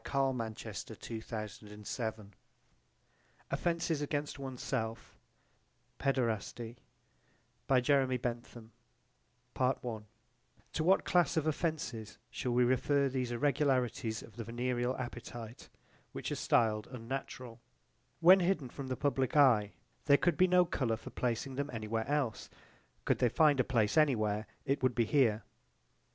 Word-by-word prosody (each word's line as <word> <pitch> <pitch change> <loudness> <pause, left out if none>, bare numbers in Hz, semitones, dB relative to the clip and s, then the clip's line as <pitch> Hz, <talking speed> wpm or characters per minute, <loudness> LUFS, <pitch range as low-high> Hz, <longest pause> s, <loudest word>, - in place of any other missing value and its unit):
Punishment 135 -2 0
not 110 -1 -5
necessary 115 - -6
for 115 - -7
the 105 +1 -12
sake 110 +3 -2
of 110 - -4
women 105 -2 -14 1.2
OFFENCES 165 -3 0
AGAINST 145 0 -3
ONE'S 130 -2 -6
SELF: 115 -3 -3 0.8
PAEDERASTY 120 -3 -1 0.9
To 125 -4 0 2.0
what 190 +4 +4
class 175 -2 +2
of 155 - +1
offences 155 -9 -2
shall 125 - -2
we 125 +1 +4
refer 135 +3 +2
these 130 -2 -2
irregularities 125 -4 0
of 115 - -15
the 115 - -4
venereal 120 +2 -1
appetite 120 -1 -7 0.4
which - - -4
are - - 0
stiled 110 -2 +2
unnatural? 125 -1 -6 0.6
When 185 +3 +8
hidden 175 -8 0
from 135 +2 -7
the 130 -1 -3
public 135 0 0
eye 115 -8 +5 0.3
there 140 -1 +6
could 175 0 +2
be 185 - +5
no 180 0 +5
colour 125 -9 -1
for - - -10
placing 125 +2 -2
them 140 +1 -2
any 110 -3 -5
where 110 +1 -1
else: 140 -6 -1 0.6
could - - +2
they 125 - +4
find 150 0 +4
a - - +5
place 110 -5 +1
any 150 -4 +4
where 105 0 -1 0.2
it 140 +1 0
would 130 -2 +2
be 120 -2 +2
here. 115 -5 +2
125 Hz, 135 wpm, -33 LUFS, 115-140 Hz, 2.0 s, When